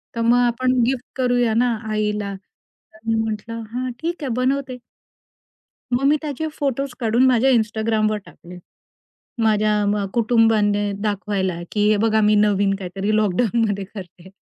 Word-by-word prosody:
तर 230 - -2
मग 240 +1 +4
आपण 255 +2 0
गिफ्ट 255 0 -1
करूया 245 -3 +2
ना 240 +1 +2 0.2
आईला. 210 -1 -1
तर 195 +2 -22
मी 225 - +2
म्हटलं 225 +1 -3
"हां, 255 +1 -3
ठीक 335 -1 -4
आहे 270 - -2
बनवते." 255 0 -1 1.2
मग 250 +3 +1
मी 290 +2 +4
त्याचे 305 +1 -3
फोटोज 275 -3 -2
काढून 235 +2 +3
माझ्या 255 +1 +4
Instagramवर 220 -1 0
टाकले. 180 +1 -13 0.8
माझ्या 210 -1 +2
म 205 0 0
कुटुंबाने 215 -3 +2
दाखवायला 200 -3 -1 0.2
की 210 0 +1
हे 215 - +4
बघा 220 +1 +2
मी 210 0 +4
नवीन 200 -1 +2
काहीतरी 195 +3 -3
लॉकडाउनमध्ये 210 0 +1
करते, 185 -2 -11
220 Hz, 140 wpm, -21 LUFS, 205-245 Hz, 1.2 s, मग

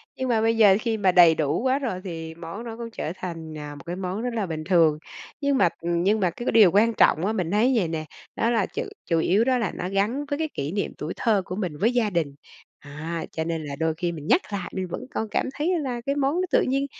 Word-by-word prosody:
nhưng 260 -1 -3
mà 225 -2 +2
bây 225 0 +2
giờ 205 -3 +7
khi 225 -2 -1
mà 190 -3 +3
đầy 170 -3 +7
đủ 150 +5 0
quá 265 +2 +2
rồi 225 -9 -3
thì 165 -3 -6
món 170 +6 -7
nó 230 -1 -7
cũng 235 -1 -6
trở 160 - -4
thành, 165 -4 -6
à, 150 -1 -7
một 145 - -12
cái 175 - -4
món 190 +2 -3
rất 245 0 -2
là 220 -3 -1
bình 160 -3 -4
thường. 165 -3 +4 0.4
Nhưng 280 -1 +2
mà 175 - +4
ừm, 170 0 0
nhưng 210 +3 +3
mà 185 -3 +2
cái 240 +8 -8
cái - - +1
điều 215 -6 +7
quan 225 +5 +4
trọng 170 -4 +4
á, 215 - 0
mình 180 -6 -2
thấy 230 +6 +3
vầy 195 -8 +2
nè, 160 -1 -3 0.3
đó 230 - +1
là 225 -5 +2
chủ - - -4 0.2
chủ 165 -2 +1
yếu 195 +7 +3
đó 255 0 +2
là 225 -6 -1
nó 180 - -4
gắn 210 +9 0
với 285 +1 -3
cái 315 -1 -1
kỷ 140 +2 -3
niệm 200 +2 -2
tuổi 155 +3 -4
thơ 215 -4 +2
của 185 - -5
mình 180 -7 -3
với 225 +9 +2
gia 235 -4 +2
đình. 160 -7 -1 0.5
Đó, - - -11 0.4
cho 160 - -2
nên 165 -1 -3
là 140 -1 -5
đôi 160 +1 0
khi 175 -1 -1
mình 155 -2 -8
nhắc 370 - +4
lại 190 -3 -4
mình 185 -1 -2
vẫn - - -5
còn 220 - -2
cảm - - 0
thấy 330 +5 0
là 250 -4 -3
cái 280 - 0
món 280 +2 +1
nó 365 - +1
tự - - +4
nhiên 275 +2 0
195 Hz, 280 wpm, -25 LUFS, 165-235 Hz, 0.5 s, giờ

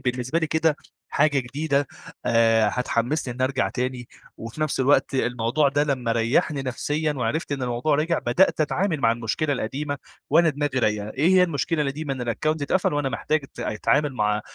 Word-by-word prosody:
بالنسبة 125 +5 -1
لي 160 - 0
كده 160 -1 +1 0.3
حاجة 145 -3 +2
جديدة، 140 +3 -1 0.4
آآ، 115 -2 +4
هتحمّسني 125 +2 -1
إني 130 +1 0
ارجع 130 0 0
تاني، 125 -1 -4 0.3
وفي 115 +7 -8
نفس 155 -3 0
الوقت 135 +1 +3
الموضوع 125 +3 +1
ده 145 +2 +1
لمَّا 130 -5 -1
ريّحني 125 +5 +1
نفسيًا 150 +4 -1
وعرفْت 140 +4 -2
إن 135 -2 -3
الموضوع 125 +5 0
رجع؛ 165 +3 +1
بدأت 155 +7 +3
أتعامل 160 +1 0
مع 115 -2 +4
المشكلة 120 +6 -1
القديمة 140 +4 -3 0.3
وانا 165 +2 +5
دماغي 145 -2 -1
رايقة، 105 -2 0
إيه 150 +6 +1
هي 185 -1 +6
المشكلة 155 -1 0
القديمة، 140 0 -3
إن 125 -2 -4
الaccount 155 +4 -1
اتقفل 165 +3 +1
وأنا 145 -2 0
محتاج 155 +3 -1
أت - - -12
أتعامل 140 +7 0
مع 105 -2 +1
140 Hz, 175 wpm, -24 LUFS, 120-155 Hz, 0.4 s, هي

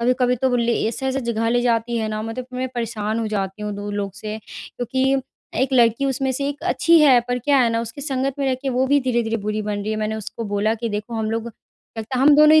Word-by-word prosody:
कभी-कभी 250 +1 +2
तो 260 +2 +1
वो 245 - +2
ले 235 0 +1
ऐसे-ऐसे 265 +3 -2
जगह 230 -2 -1
ले 240 +1 +2
जाती 235 0 +1
है 220 -1 -1
ना 215 0 -3
मतलब 225 +3 -5
मैं 255 +1 -2
परेशान 225 -2 -2
हो 225 - -1
जाती 200 -1 -3
हूँ 210 - -3
2 205 +1 -5
लोग 200 -2 -3
से। 210 +1 -5
क्योंकि 265 +2 -1 0.5
1 270 - -1
लड़की 235 0 +4
उसमें 270 0 0
से 275 +2 -2
1 290 +2 -6
अच्छी 335 0 +4
है, 270 -5 +6
पर 245 +1 -2
क्या 280 +3 +3
है 245 -3 +4
ना 230 0 0
उसकी 230 +4 -7
संगत 270 -2 -1
में 275 - 0
रह 260 - +2
के 270 - -1
वो 255 +1 +1
भी 285 +1 +3
धीरे-धीरे 240 -3 0
बुरी 215 +1 -2
बन 205 -1 -2
रही 215 - -3
है। 215 - -1
मैंने 215 0 -1
उसको 220 +1 -6
बोला 205 +1 0
कि 230 +1 -3
देखो 210 +2 -4
हम 220 -1 -1
लोग 225 +1 -2 0.5
लगता 225 +4 -4
है - - +2
हम 290 +1 +7
दोनों 305 +1 +7
ही - - +8
235 Hz, 260 wpm, -22 LUFS, 215-260 Hz, 0.5 s, ही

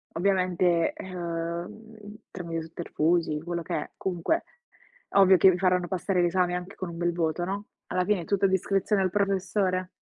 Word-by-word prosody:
ovviamente, 180 -2 +2
uhm, 185 +4 -6 0.2
tramite 170 -3 -4
i - - -5
sotterfugi, 165 -1 0
quello 170 +1 -3
che 170 +1 -4
è - - -4
comunque, 190 - -1 0.7
ovvio 190 -1 +6
che 190 +3 +7
vi 180 - -1
faranno 180 -1 +2
passare 185 +1 0
l'esame 175 0 +2
anche 180 +2 -6
con 185 - -5
un 170 - -8
bel 175 0 0
voto, 170 0 -1
no, 200 +2 -4 0.2
alla 180 0 0
fine, 195 -4 0
tutto 200 +2 -1
a - - +6
discrezione 195 +2 +1
del 185 - 0
professore. 190 -1 0
180 Hz, 170 wpm, -27 LUFS, 170-195 Hz, 0.7 s, che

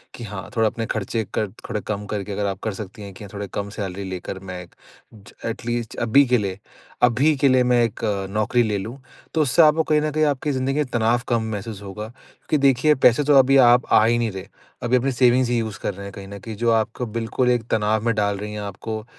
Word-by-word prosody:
कि 120 - -9
हाँ 100 -3 -7
थोड़ा 110 -1 +4
अपने 115 +1 -4
खर्चे 110 +1 -2
कर 105 - 0 0.2
थोड़े 105 -4 -2
कम 105 -1 -3
करके 105 0 -4
अगर 100 +1 -2
आप 95 0 -3
कर 110 -3 -2
सकती 105 +1 -8
हैं 100 -1 -8
कि 105 - -11
हाँ, 100 - -9
थोड़ी 100 0 -5
कम 100 0 -3
सैलरी 100 -2 -5
लेकर 95 +1 -6
मैं 95 -1 -7
एक, 85 - -20 0.4
ज 100 -2 -16
एटलीस्ट 120 0 -3
अभी 120 +5 +5
के 125 0 +3
लिए 100 -2 -3 0.4
अभी 135 +6 +4
के 140 - +3
लिए 130 -1 +4
मैं 125 -1 +3
एक 115 - -2 0.3
नौकरी 110 +3 +2
ले 105 -2 -1
लूँ। 115 +7 -6 0.4
तो 160 - +2
उससे 150 +3 +4
आपको 155 +1 +5
कहीं 150 -1 +2
न 155 0 -1
कहीं 155 +1 +1
आपकी 145 0 0
ज़िंदगी 130 0 -1
में 150 -1 +1
तनाव 120 +1 +2
कम 115 -2 +1
महसूस 105 0 -6
होगा, 105 +2 -7 0.4
क्योंकि 155 - +3
देखिए 135 +4 +3
पैसे 130 +2 +4
तो 145 0 +4
अभी 135 +1 +6
आप 125 -1 +6
आ - - +7
ही 120 +1 +3
नहीं 115 -3 0
रहे। 95 -1 -8 0.4
अभी 120 +1 +2
अपनी 135 +2 0
सेविंग्स 125 0 +3
ही 120 - +1
यूज़ 110 -3 -4
कर 100 - -3
रहे 100 - -9
हैं 100 - -8
कहीं 100 -1 -9
न 100 0 -9
कहीं, 110 +2 -8
जो 115 +2 +1
आपको 115 +2 0
बिल्कुल 115 +3 -1
एक 120 -2 +1
तनाव 110 0 +1
में 115 - +2
डाल 100 -1 0
रही 105 +1 -6
हैं, 105 - -5
आपको 110 +2 -6
115 Hz, 245 wpm, -22 LUFS, 100-125 Hz, 0.4 s, आ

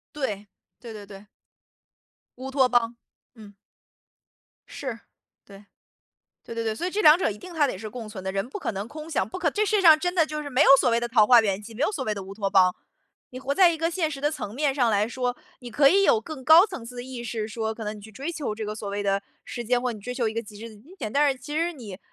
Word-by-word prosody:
对， 210 -8 -3 0.3
对 235 -2 -10
对 210 -2 -10
对。 200 +1 -13 1.1
乌 260 +1 -6
托 265 -1 +3
邦， 240 -1 +1 0.4
嗯。 210 -3 -14 1.1
是， 255 -5 -6 0.5
对。 200 0 -15 0.8
对 230 - -9
对 230 - -2
对， 220 -1 -1
所 340 +11 -3
以 - - -2
这 410 +3 -1
2 305 -3 +8
者 - - +1
一 210 - -6
定 365 +9 -11
它 300 -3 +2
得 220 - -4
是 215 +2 -7
共 230 0 -8
存 205 -3 -9
的， 190 - -3
人 195 +3 -2
不 280 - -6
可 375 - -3
能 200 +1 -5
空 310 +4 -9
想， 200 - 0
不 220 - -7
可 355 -4 +1
这 425 +6 0
世 430 - +1
界 - - +2
上 320 -4 +7
真 355 +2 -2
的 330 -3 +4
就 305 -1 -5
是 290 - -7
没 265 +1 +2
有 - - +5
所 - - +2
谓 230 - +2
的 235 - -1
桃 225 -3 +4
花 240 -1 +8
源 200 -2 -1
记， 225 +2 -11
没 245 - -6
有 305 - +2
所 280 -10 -4
谓 215 - 0
的 200 - -6
乌 195 +1 -9
托 200 -1 -2
邦。 185 -2 +4 0.6
你 255 - -8
活 270 +1 -2
在 365 +2 +6
一 330 - -2
个 330 +1 -1
现 335 -3 -1
实 280 -3 -7
的 295 +1 +1
层 210 -8 -6
面 285 0 +1
上 250 -4 +2
来 210 -1 +2
说， 245 +1 -2 0.2
你 245 - -9
可 275 +4 +5
以 395 +4 +4
有 220 - +4
更 265 +1 -9
高 320 +5 +8
层 360 - -8
次 250 +1 -10
的 245 - -6
意 255 -1 -7
识 225 -2 -4
说， 220 0 -3
可 220 - -8
能 210 0 -5
你 - - -11
去 210 +2 -13
追 280 +9 -5
求 290 -10 -4
这 220 0 -5
个 210 - -4
所 210 -1 -6
谓 205 0 -3
的 200 0 0 0.2
时 240 - -6
间， 245 +2 +1
或 250 0 -1
你 220 - -8
追 250 +5 -6
求 240 -3 0
一 - - -7
个 230 - -2
极 210 -2 -13
致 230 +2 -8
的 220 - -14
金 295 - -17
钱， 215 - -5
但 290 +3 +3
是 265 - -2
其 295 +3 -8
实 335 +3 0
你 210 - -10
245 Hz, 305 characters per minute, -25 LUFS, 215-295 Hz, 1.1 s, 2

